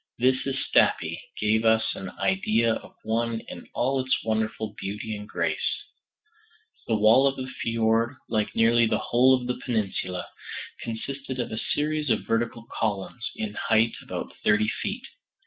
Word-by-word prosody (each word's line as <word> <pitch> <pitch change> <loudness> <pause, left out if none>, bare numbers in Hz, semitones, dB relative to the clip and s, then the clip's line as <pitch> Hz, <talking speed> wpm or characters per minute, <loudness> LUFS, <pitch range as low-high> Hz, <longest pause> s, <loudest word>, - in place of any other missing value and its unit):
This 130 +2 +2
at 135 - -1
Stapi - - +2 0.2
gave 110 +1 +2
us 110 0 +3
an 95 - -6
idea 110 +4 +2
of - - -8
one 115 +1 0
in - - -10
all 135 +2 +1
its 130 0 +1
wonderful 110 -1 -1
beauty 105 +2 -4
and 105 +1 -8
grace. - - -1 1.1
The 115 - +2
wall 110 +6 +6
of 135 - +1
the 130 - -4 0.2
fjord, 115 +2 +2
like 110 -2 -1
nearly 115 0 +5
the - - +2
whole 130 +2 +4
of 125 - -7
the 125 0 -3
peninsula, 100 -6 -2 0.6
consisted 130 +3 -5
of 120 - -2
a 110 - -3
series 150 +1 -1
of 110 - +1
vertical 115 0 0
columns, 110 +2 -2
in 105 -1 -3
height 110 +1 +2
about - - -5
thirty 105 0 +4
feet. - - -3
115 Hz, 155 wpm, -26 LUFS, 110-125 Hz, 1.1 s, wall